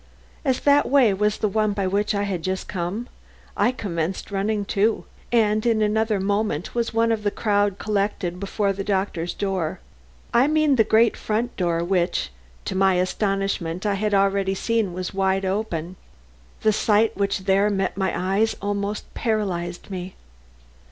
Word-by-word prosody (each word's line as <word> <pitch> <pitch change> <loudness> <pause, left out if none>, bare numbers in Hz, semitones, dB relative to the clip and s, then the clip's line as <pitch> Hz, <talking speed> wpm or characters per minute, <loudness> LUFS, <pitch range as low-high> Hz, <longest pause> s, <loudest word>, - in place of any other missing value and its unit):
As 260 -4 +1
that 285 0 +4
way 255 -7 +5
was 210 +2 +1
the 215 - 0
one 215 0 +1
by 200 -1 -1
which 205 +3 0
I 200 - 0
had 195 -4 -2
just 185 +2 -3
come, 195 +6 -3 0.5
I 245 - +3
commenced 185 -6 -3
running 200 +1 -1
too, 210 +3 +1 0.3
and 215 -2 +3
in 225 -2 +2
another 215 0 +1
moment 200 -4 -1
was 235 -1 -1
one 230 0 +2
of 220 -2 -1
a 205 - +2
crowd 205 -2 +1
collected 200 -4 -1
before 200 +1 -1
the 195 +1 -4
doctor's 190 -4 -1
door. 190 -5 -2 0.5
I 240 +4 +5
mean 305 -2 +3
the 225 - +5
great 220 +1 +3
front 225 +3 -2
door 170 -2 0
which, 175 - 0 0.3
to - - -3
my 190 0 +3
astonishment, 195 -1 -1
I 205 - +2
had 205 +1 0
already 195 0 +2
seen 225 -1 0
was 185 +2 -4
wide 195 0 +1
open. 185 -3 -2 0.6
The 215 - +3
sight 215 +1 +2
which 200 -1 -1
there 195 +2 +3
met 195 -2 -1
my 190 -1 0 0.3
eyes 225 0 +2
almost 205 +1 -3
paralyzed 190 -6 -2
me. 185 0 -6
200 Hz, 165 wpm, -23 LUFS, 190-215 Hz, 0.6 s, way